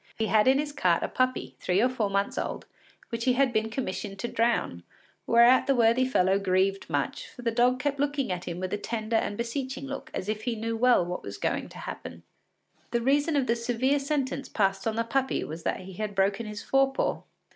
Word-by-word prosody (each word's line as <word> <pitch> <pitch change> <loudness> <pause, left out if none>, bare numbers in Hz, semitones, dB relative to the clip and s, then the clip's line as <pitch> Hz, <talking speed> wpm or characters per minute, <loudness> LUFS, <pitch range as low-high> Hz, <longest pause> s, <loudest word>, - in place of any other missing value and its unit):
He 225 - 0
had 215 +3 +3
in 265 +1 +6
his 295 +1 -2
cart 180 -10 +2
a - - 0
puppy, 255 0 -1
three 180 +1 +1
or 240 - +4
four 240 -5 -1
months 200 0 0
old, - - -3 0.4
which 230 0 -3
he 255 - +4
had 265 -1 +2
been 220 0 +1
commissioned 210 -4 -4
to 215 - -3
drown, 230 - 0 0.5
whereat 235 +2 +6
the 275 - +3
worthy 235 +2 +4
fellow 190 -6 +2
grieved 195 0 +1
much, 145 -3 -2
for 245 - -12
the 230 - +1
dog 250 +2 +3
kept 280 +1 -1
looking 285 -5 0
at 180 -1 -3
him 170 0 -5
with 185 0 -3
a 205 - -1
tender 220 +2 -1
and 205 - -1
beseeching 260 +3 -3
look 275 0 -6
as 185 - -4
if 215 0 -2
he 240 -2 0
knew 225 +1 -3
well 240 -5 +4
what 180 +1 -4
was 100 0 -7
going - - -2
to - - -12
happen. 85 0 -8 0.7
The 235 - 0
reason 285 +5 +2
of 275 -3 +2
the 235 - +1
severe 245 +4 +1
sentence 275 -1 -2
passed 195 0 0
on 220 - 0
the 230 - +1
puppy 265 +3 0
was 160 +2 -7
that - - -2
he 190 +1 -10
had 210 +2 -4
broken 195 +3 +1
his 210 -1 -6
fore 270 0 +3
paw. 270 - -1
230 Hz, 225 wpm, -27 LUFS, 195-260 Hz, 0.7 s, in